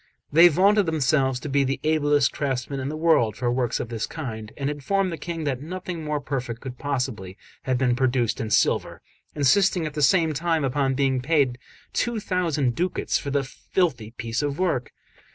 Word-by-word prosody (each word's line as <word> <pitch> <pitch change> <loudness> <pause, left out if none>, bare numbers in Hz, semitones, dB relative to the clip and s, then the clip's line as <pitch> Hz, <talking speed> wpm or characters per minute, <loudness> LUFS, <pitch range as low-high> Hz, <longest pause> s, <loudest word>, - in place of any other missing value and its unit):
They 165 +3 +9
vaunted 195 +4 +3
themselves 135 -4 +1
to - - -5
be 140 0 +2
the 135 +1 -1
ablest 145 -2 +2
craftsmen 135 -1 -2
in 130 +1 -3
the 155 - -4
world 155 -10 +3
for 120 -1 0
works 125 -1 0
of 115 - -4
this 115 -2 -3
kind, 110 -8 -6
and 140 - -2
informed 180 +7 0
the - - -3
King 170 -2 -4
that 135 -3 -2
nothing 175 +1 -6
more 150 -1 -1
perfect 125 -5 -4
could 125 -1 -8
possibly 125 -9 -3 0.3
have 130 -1 +1
been 125 -1 +2
produced 125 -2 0
in 110 - -3
silver, - - +1 0.3
insisting 175 +4 +3
at 155 - -4
the 150 - -3
same 160 +2 +4
time 165 +1 0
upon 135 0 0
being 135 -2 +1
paid 135 -3 +1 0.3
two 240 -2 0
thousand 165 - 0
ducats 180 +7 -1
for 140 - -5
their 140 0 +1
filthy 135 - -2
piece 115 +2 -2
of 145 0 -2
work. 160 -10 -1
140 Hz, 190 wpm, -24 LUFS, 125-160 Hz, 0.3 s, They